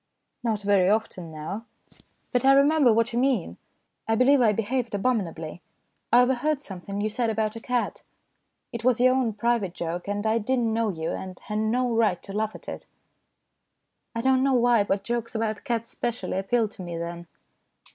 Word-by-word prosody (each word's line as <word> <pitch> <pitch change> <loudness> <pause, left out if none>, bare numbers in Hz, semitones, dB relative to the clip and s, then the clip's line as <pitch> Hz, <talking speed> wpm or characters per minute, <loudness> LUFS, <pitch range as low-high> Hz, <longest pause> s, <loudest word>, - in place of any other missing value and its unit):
" - - -52
Not 220 -3 -1
very 200 -2 +4
often 200 -6 -1
now. 160 +9 -6 0.7
But 245 0 +1
I 270 +1 +7
remember 280 -1 +5
what 230 +1 +2
you 235 - +1
mean. 245 - 0 0.5
I 225 - +2
believe 265 +3 +5
I 225 -3 +5
behaved 225 +2 -1
abominably. 180 -8 -2 0.5
I 245 +2 +7
overheard 265 +4 +1
something 200 -5 -7
you 210 - 0
said 230 +2 -1
about 215 0 -1
a - - -5
cat. 245 +1 -2 0.7
It 235 -1 -5
was 250 -2 +3
your 255 +1 +5
own 255 -4 +1
private 210 -4 0
joke, 170 +2 -4
and 205 +1 -2
I 220 +1 +2
did 255 +5 0
not 230 -2 +1
know 225 -1 +1
you, 160 -4 -3
and 185 -1 -6
had 210 0 -3
no 240 +3 +1
right 215 -6 +2
to 195 - -8
laugh 215 +1 -1
at - - -12
it. - - -7 1.3
I 230 - -1
don't 260 +1 +3
know 270 0 +3
why, 240 -3 +4
but 195 0 -1
jokes 235 -1 -3
about 220 -1 -2
cats 230 -3 -2
specially 240 -5 -3
appealed 220 +2 0
to 195 - -11
me 175 -2 -5
then. 170 0 -6
225 Hz, 190 wpm, -26 LUFS, 200-245 Hz, 1.3 s, I